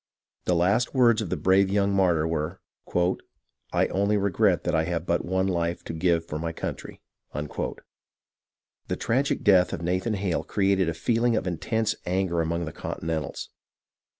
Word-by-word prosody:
The 90 - +2
last 100 +10 +2
words 120 -3 +5
of 100 - -4
the - - -1
brave 95 +1 +3
young 100 0 +2
martyr 85 -5 +3
were, 80 +2 -2 0.2
" - - -21 0.8
I - - +5
only 100 +2 +1
regret 100 -3 +2
that - - -1
I 80 0 +2
have 85 -1 -2
but 85 -1 0
one 95 +1 0
life 85 -2 -1
to - - -6
give 85 0 +1
for 75 -2 -5
my 85 +1 -2
country." 80 - -6 0.3
The 75 0 -8
tragic 135 +5 0
death 95 -3 +5
of - - -4
Nathan 95 +6 0
Hale 95 -4 -1
created 95 -3 +1
a 80 - -3
feeling 115 +7 +1
of 105 - -1
in 85 -3 -2
tense 110 -1 0
anger 90 -2 +1
among 85 +1 -1
the 80 - -7
Continentals. 80 -3 -4
90 Hz, 170 wpm, -26 LUFS, 85-100 Hz, 0.8 s, words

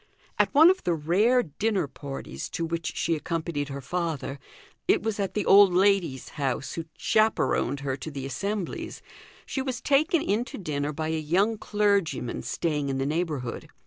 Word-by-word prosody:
At - - +3
one 320 +5 +9
of 375 - -3
the 175 - +1
rare 205 +11 +3
dinner 190 +2 -1
parties 135 0 -7
to 165 - -1
which 165 0 -3
she 170 - +1
accompanied 160 -2 -3
her 140 0 -5
father 155 -2 -3 0.5
it - - +3
was 220 -2 -2
at 195 -2 -2
the 210 - 0
old 195 -2 +7
lady's 185 -8 +2
house 135 -3 -2
who 165 - -4
chaperoned 215 - +1
her 135 -2 -2
to 145 - -6
the 140 -3 -6
assemblies 195 - -4 0.4
she 265 - -3
was 260 -2 -3
taken 310 +4 +2
in 210 +4 +1
to - - -8
dinner 150 -5 -2
by 155 +1 -3
a 160 0 0
young 185 +9 +2
clergyman 200 - 0
staying 150 -4 -1
in 135 - -1
the 135 - -1
neighbourhood. 150 -5 -2
170 Hz, 175 wpm, -27 LUFS, 145-205 Hz, 0.5 s, one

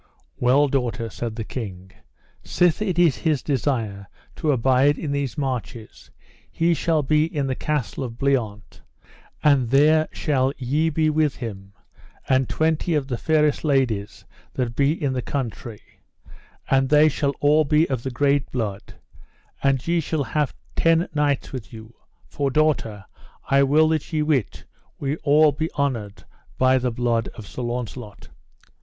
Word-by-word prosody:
Well 135 +4 +4
daughter, 120 -4 -2
said 115 -1 -5
the 115 - -4
king, 95 -6 -7 0.5
sith 175 +2 +1
it 190 -5 -1
is 170 -7 +4
his 155 -5 0
desire 115 -8 -2 0.3
to 155 -3 +1
abide 135 +3 +3
in 150 - -4
these 140 -3 -2
marches 125 -5 -5 0.4
he 170 +1 +1
shall 160 0 0
be 150 +2 +2
in 150 -4 -2
the 135 - -1
Castle 145 -2 -3
of 115 -2 -6
Bliant, 120 -8 -2 0.6
and 140 -5 +3
there 155 +4 +4
shall 135 -3 0
ye 145 +5 0
be 155 0 +1
with 155 -2 +1
him, 100 -5 -8 0.5
and 130 -1 +2
twenty 160 +1 0
of 140 -2 -1
the 120 - -2
fairest 150 -2 +1
ladies 130 -9 -1 0.3
that 120 -2 -2
be 140 +1 +3
in 140 -3 -1
the 125 - -2
country, 115 -5 -6 0.7
and 135 -1 +2
they 150 +1 +6
shall 140 -1 -1
all 150 +2 +4
be 155 +3 +2
of 130 -4 -2
the 130 - -4
great 140 +2 0
blood, 105 -6 -4 0.7
and 135 -2 +1
ye 170 0 +2
shall 155 -2 -1
have 145 +3 -1 0.2
ten 165 +1 +3
knights 145 -2 0
with 130 -5 -7
you; 110 0 -11 0.3
for, 140 -1 -2
daughter, 130 -9 0 0.5
I 135 0 +5
will 150 +3 +4
that 160 -2 -2
ye 155 -2 0
wit 140 - -1 0.3
we 140 +2 -2
all 150 0 +4
be 160 +3 -3
honoured 115 -8 -3 0.3
by 130 0 +4
the 125 0 -1
blood 115 -1 -1
of 110 - -9
Sir 125 - -7
Launcelot. 120 -2 -6
135 Hz, 155 wpm, -23 LUFS, 120-150 Hz, 0.7 s, they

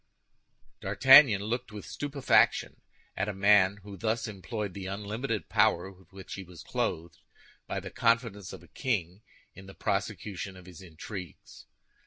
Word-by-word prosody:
D'Artagnan 135 -6 +7
looked 120 +2 -3
with 105 -2 -8
stupefaction 145 -2 +1 0.3
at 100 +2 -1
a 105 - -4
man 100 0 +4
who 100 -1 -9
thus 110 +6 -1
employed 105 0 -5
the 95 0 -6
unlimited 105 +4 -4
power 105 -4 +2
with 95 -3 -21
which 95 -1 -10
he 95 - -6
was 90 -2 -13
clothed 85 +2 -3 0.5
by - - -3
the - - -9
confidence 115 -4 0
of - - -10
a - - -16
king 95 -6 -3 0.3
in 95 +1 -13
the 95 - -12
prosecution 95 -2 -3
of 90 - -14
his 90 -3 -12
intrigues. 90 +1 -10
100 Hz, 150 wpm, -29 LUFS, 95-110 Hz, 0.5 s, D'Artagnan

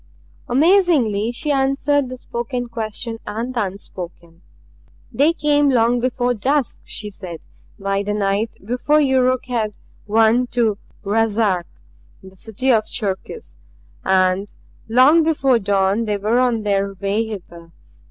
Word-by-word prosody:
Amazingly 270 - +3
she 295 +5 -2
answered 275 0 +1
the 255 - -7
spoken 245 0 -4
question 225 0 -4
and 230 +4 -4
the 235 -4 0
unspoken. 175 -3 -9 0.7
"They 295 +4 +3
came 290 -3 +2
long 240 -1 +3
before 245 0 0
dusk," 265 +5 -1
she 210 -1 -4
said. 180 -4 -8 0.4
"By 195 -1 -1
the 205 +1 -2
night 205 +2 -1
before 250 +7 +2
Yuruk 255 -3 +2
had 225 -5 -2 0.3
won 225 +3 +3
to 220 -4 +2 0.2
Ruszark, 210 -3 +1 0.6
the 190 0 -14
city 225 +7 -1
of 220 -3 +2
Cherkis; 195 - -5 0.4
and 190 +1 +2 0.4
long 260 +8 +6
before 275 -6 +2
dawn 200 +2 +1
they 210 -1 -1
were 215 +5 +1
on 240 -4 +1
their 200 -1 0
way 200 +3 -1
hither. 175 -6 -9
225 Hz, 130 wpm, -20 LUFS, 200-255 Hz, 0.7 s, long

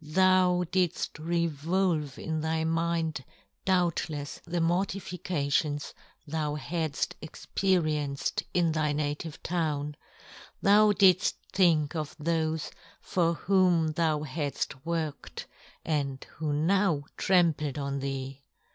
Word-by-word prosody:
Thou 180 +2 +4
didft 180 -5 0
re 170 +2 0
volve 160 -1 -1
in 160 -1 -3
thy 160 0 0
mind, 165 -3 0 0.4
doubtlefs, 170 -5 0
the 175 0 -2
mor 175 +3 +2
tifications 165 -6 -2 0.3
thou 150 -1 -2
hadft 160 -1 -2
experienced 155 -3 -1
in 170 -2 +2
thy 155 -2 0
native 150 +2 -3
town, 150 -4 -1 0.6
thou 210 +1 +6
didft 190 -2 +4 0.2
think 165 -5 +3
of 155 -1 -4
thofe 160 0 -1 0.3
for 170 -2 +1
whom 180 -4 +3
thou 155 -1 +1
hadft 140 -2 -3
worked, 160 -3 -4 0.4
and 140 -4 -1
who 155 -1 -2
now 165 +1 +2
trampled 165 -6 +2
on 140 -1 -2
thee 135 0 -4
160 Hz, 110 wpm, -29 LUFS, 150-175 Hz, 0.6 s, thou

